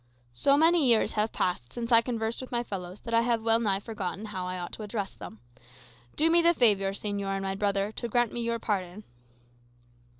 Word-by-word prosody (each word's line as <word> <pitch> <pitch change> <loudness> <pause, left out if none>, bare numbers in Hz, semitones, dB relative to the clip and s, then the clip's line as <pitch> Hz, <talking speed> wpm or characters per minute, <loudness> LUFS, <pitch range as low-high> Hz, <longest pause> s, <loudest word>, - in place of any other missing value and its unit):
"So 275 - +3
many 325 -1 +4
years 230 -2 +3
have 215 +1 0
passed 130 -10 -2
since 235 0 -5
I 230 - +8
have 230 - +3
conversed 230 -1 -2
with 255 - -9
my 240 -1 0
fellows, 185 -3 -7
that 230 - -6
I 230 - +5
have 235 -1 0
well 225 0 +4
nigh 200 -4 0
forgotten 205 -2 -5
how 190 -4 -5
I 185 0 -4
ought 175 -1 -6
to - - -7
address 210 -1 -4
them. 110 - -11 0.7
Do 325 +2 +3
me 340 +1 +6
the 340 0 +4
favour, 205 -7 +4
señor 200 -1 -3
and 195 - -3
my 195 0 -2
brother, 200 0 -1
to 235 - -5
grant 240 0 +1
me 240 - -2
your 235 0 -1
pardon." 200 -2 -3
215 Hz, 220 wpm, -28 LUFS, 195-235 Hz, 0.7 s, I